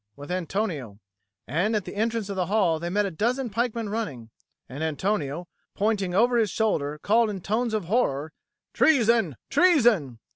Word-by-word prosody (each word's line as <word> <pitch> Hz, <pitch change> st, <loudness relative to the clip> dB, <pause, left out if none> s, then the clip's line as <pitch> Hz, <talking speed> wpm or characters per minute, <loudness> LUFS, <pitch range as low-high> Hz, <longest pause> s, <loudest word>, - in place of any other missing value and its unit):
with 145 Hz, +4 st, -9 dB
Antonio. 170 Hz, -, -3 dB, 0.5 s
And 180 Hz, -, 0 dB
at 205 Hz, -3 st, -1 dB
the -, -, -7 dB
entrance 225 Hz, 0 st, -1 dB
of 200 Hz, -, -4 dB
the 180 Hz, -2 st, -1 dB
hall 185 Hz, -6 st, +2 dB
they 170 Hz, +1 st, -4 dB
met 205 Hz, +3 st, +1 dB
a 195 Hz, -, -3 dB
dozen 240 Hz, +7 st, -1 dB
pikemen 230 Hz, 0 st, -1 dB
running; 150 Hz, -, -4 dB, 0.4 s
and 135 Hz, +5 st, -6 dB
Antonio, 160 Hz, 0 st, -2 dB, 0.3 s
pointing 200 Hz, -4 st, 0 dB
over 240 Hz, +4 st, +4 dB
his 220 Hz, -3 st, +2 dB
shoulder, 150 Hz, -9 st, -1 dB
called 225 Hz, +2 st, +3 dB
in 200 Hz, -2 st, -4 dB
tones 220 Hz, +5 st, -1 dB
of 210 Hz, -5 st, -2 dB
horror, 160 Hz, -, 0 dB, 0.4 s
"Treason, 230 Hz, -, +3 dB, 0.2 s
treason!" 240 Hz, -, +4 dB
205 Hz, 160 wpm, -25 LUFS, 160-225 Hz, 0.5 s, over